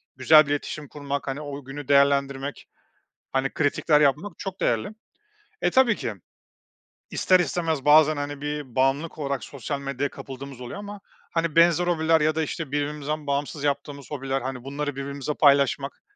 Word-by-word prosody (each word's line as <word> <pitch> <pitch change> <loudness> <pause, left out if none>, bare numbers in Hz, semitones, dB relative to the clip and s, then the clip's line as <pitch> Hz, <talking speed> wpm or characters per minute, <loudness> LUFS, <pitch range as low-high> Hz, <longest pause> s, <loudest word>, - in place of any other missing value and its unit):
güzel 150 +4 +6
bir 145 - -4
iletişim 145 0 -3
kurmak, 140 -1 -5
hani, 135 +2 -3
o 145 -1 -7
günü 135 +1 -8
değerlendirmek, 140 0 +2 0.7
hani, 135 0 0
kritikler 150 0 +2
yapmak 150 +7 +2
çok 190 -1 -6
değerli. 115 -2 +1 0.7
E, - - +3
tabii 255 -5 +4
ki. 115 - -4 1.0
İster 185 -1 +3
istemez 165 -5 -1
bazen, 155 +1 +6
hani, 145 0 -4
bir 145 -3 -5
bağımlılık 135 +5 +1
olarak 140 -2 -2
sosyal 140 +1 -5
medyaya 140 0 -2
kapıldığımız 135 -1 -9
oluyor 125 +10 -7
ama, 205 0 -8 0.3
hani, 165 -1 -1
benzer 170 +1 +5
hobiler 160 -2 +3
ya 155 +1 +2
da, 160 - 0
işte, 155 -1 -4
birbirimizden 150 +1 -2
bağımsız 140 +1 -2
yaptığımız 140 -1 -3
hobiler, 135 -2 -2
hani, 130 -1 -5
bunları 145 0 -4
birbirimizle 140 +1 -4
paylaşmak, 140 -1 +3
145 Hz, 155 wpm, -25 LUFS, 140-155 Hz, 1.0 s, güzel